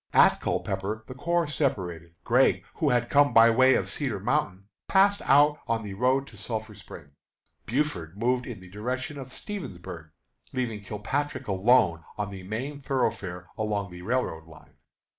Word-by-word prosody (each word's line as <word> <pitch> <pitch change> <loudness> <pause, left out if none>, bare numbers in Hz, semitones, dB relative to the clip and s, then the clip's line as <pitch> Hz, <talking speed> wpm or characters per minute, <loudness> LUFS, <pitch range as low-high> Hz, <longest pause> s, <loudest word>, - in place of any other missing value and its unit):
At - - +5
Culpepper 100 +3 -2
the - - -7
corps 170 +6 0
separated. 90 - -2
Gregg, - - +3
who - - +2
had 120 -1 +2
come 145 +2 +4
by 115 0 +8
way 130 +3 +5
of - - 0
Cedar 130 -9 -2
Mountain, 100 -4 -1 0.2
passed 200 +1 +4
out 145 +1 +5
on 115 -1 0
the 100 -2 -6
road 130 +6 +2
to 110 - -14
Sulphur 110 +1 -4
Springs. 85 -7 -12 0.6
Buford 105 - -2
moved 125 +3 0
in 115 -7 -7
the 95 - -12
direction 130 +7 -4
of 130 -1 -8
Stevensburg, 95 - -7 0.4
leaving 120 -5 -2
Kilpatrick 120 +9 -3
alone 95 -2 +4 0.2
on 105 -1 -3
the 95 -1 -8
main 125 +10 -5
thoroughfare 95 -10 -2
along 105 -3 -1
the 90 0 -9
railroad 90 -7 -2
line. 80 - -17
115 Hz, 160 wpm, -27 LUFS, 95-135 Hz, 0.6 s, by